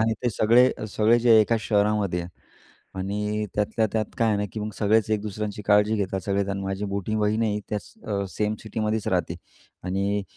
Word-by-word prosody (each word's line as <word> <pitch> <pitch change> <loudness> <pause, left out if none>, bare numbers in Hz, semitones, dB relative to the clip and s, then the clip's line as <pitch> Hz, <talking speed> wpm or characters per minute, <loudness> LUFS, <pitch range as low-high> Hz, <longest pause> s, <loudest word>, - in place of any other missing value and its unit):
आणि 110 0 +2
ते 120 - +1
सगळे 120 +4 +4 0.2
सगळे 110 +3 +3
जे 115 -2 +6
एका 115 +2 +2
शहरामध्ये 105 -4 +1
आहे. 85 - -6 0.7
आणि 105 +2 -2
त्यातल्या 110 +2 +1
त्यात 110 -1 +1
काय 115 -2 +3
आहे 105 - +2
ना, 100 - -1
की 110 - -5
मग 105 - -3
सगळेच 110 0 +2
एक 110 - +1
दुसऱ्यांची 105 0 -4
काळजी 105 +1 +3
घेतात. 95 -2 -2
सगळेच 100 +1 -1
आणि 100 0 -3
माझी 95 +1 -3
मोठी 100 +1 -3
बहीण 105 +1 +1
आहे 105 -2 0
त्याच 105 -1 -5
अ, 100 -2 -2
सेम 105 +2 -1
सिटीमध्येच 110 0 -2
राहते. - - -1 0.5
आणि 100 +2 -1
105 Hz, 190 wpm, -25 LUFS, 100-110 Hz, 0.7 s, जे